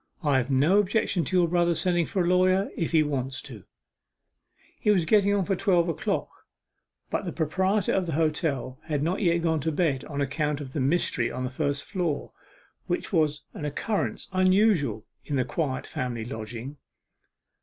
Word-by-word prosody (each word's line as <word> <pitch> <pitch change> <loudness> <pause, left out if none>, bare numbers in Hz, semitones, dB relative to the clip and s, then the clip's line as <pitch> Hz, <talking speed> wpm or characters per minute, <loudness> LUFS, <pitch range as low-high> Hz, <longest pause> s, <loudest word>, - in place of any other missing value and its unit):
'I 145 -3 +3
have 125 +1 -3
no 145 +9 +4
objection 200 -3 +1
to 185 - +1
your 175 -1 +4
brother 175 0 +2
sending 175 -1 +1
for 185 - 0
a - - 0
lawyer, 185 +2 +3
if 165 - -2
he 160 -2 +4
wants 135 -2 -2
to.' 120 -10 -10 1.2
It - - +1
was 180 -5 +2
getting 200 +2 +4
on 200 -2 +1
for 195 - 0
twelve 175 -2 +2
o'clock, 165 - -1 0.8
but - - -1
the - - -4
proprietor 185 +5 0
of 185 -2 0
the 165 - -2
hotel 150 -4 -1
had 150 -3 -1
not 175 +6 -1
yet 170 -3 +2
gone 160 -2 +1
to 160 +3 -1
bed 150 -5 0
on 145 -2 -5
account 145 +1 -1
of 135 -3 -8
the - - -2
mystery 135 -4 +1
on 130 - -4
the 125 - -3
first 140 +1 -1
floor, 175 -7 -2 0.6
which - - -2
was 150 -2 +1
an - - -7
occurrence 195 +9 -2
unusual 185 - +3 0.2
in 145 - -3
the 130 -2 +1
quiet 135 -1 -2
family 120 -3 -4
lodging. 120 +3 -7
160 Hz, 180 wpm, -26 LUFS, 140-180 Hz, 1.2 s, no